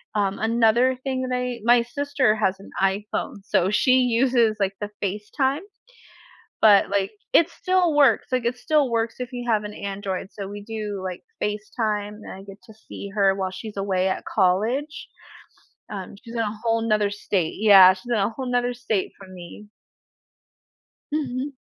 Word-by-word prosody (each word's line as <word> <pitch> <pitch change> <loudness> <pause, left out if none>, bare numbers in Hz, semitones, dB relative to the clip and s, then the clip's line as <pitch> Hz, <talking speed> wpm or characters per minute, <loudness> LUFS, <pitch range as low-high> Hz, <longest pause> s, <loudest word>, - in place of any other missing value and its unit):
Um, 200 -2 0
another 235 +3 +3
thing 260 -1 -2
that 255 -1 -3
I 250 -1 -3
my 240 +1 +5
sister 270 -2 0
has 195 -3 +1
an 195 - -13
iPhone 195 +2 -1
so 185 - +2
she 255 +5 +3 0.2
uses, 240 -4 +3
like, 195 -1 0
the 205 - -3
FaceTime, 215 - -1 1.0
but, 205 -3 +6
like, 200 0 0 0.2
it 335 0 +5
still 365 -1 +1
works, 285 -2 +4
like, 255 -2 0
it 240 +1 -1
still 295 +1 +1
works 230 -1 -1
if 250 -1 -4
you 245 -1 -5
have 215 -2 +2
an 210 0 -7
Android, 195 -2 -4
so 200 -2 -7
we 205 +1 -8
do 210 -2 -5
like 185 -1 -5 0.2
FaceTime, 210 0 -2
and - - -9
I 190 - -10
get 195 0 -12
to 220 - -14
see 200 - -7
her 195 -2 +3
while 190 -1 -2
she's 205 +2 -8
away 190 -1 0
at - - -3
college. 220 +10 0 0.8
Um, 195 -2 -7
she's 230 - -10
in - - -2
a 215 -1 -3
whole 230 -1 +1
'nother 210 -2 +2
state. 190 -4 -2
Yeah, 195 -3 +8
she's 195 +6 -10
in 235 - +2
a 200 0 +1
whole 255 +3 -6
'nother 245 0 +1
state 225 -5 -2
from 190 -1 -13
me. 180 +4 -11 1.4
Mhm. 275 -2 -2
215 Hz, 175 wpm, -23 LUFS, 200-245 Hz, 1.4 s, Yeah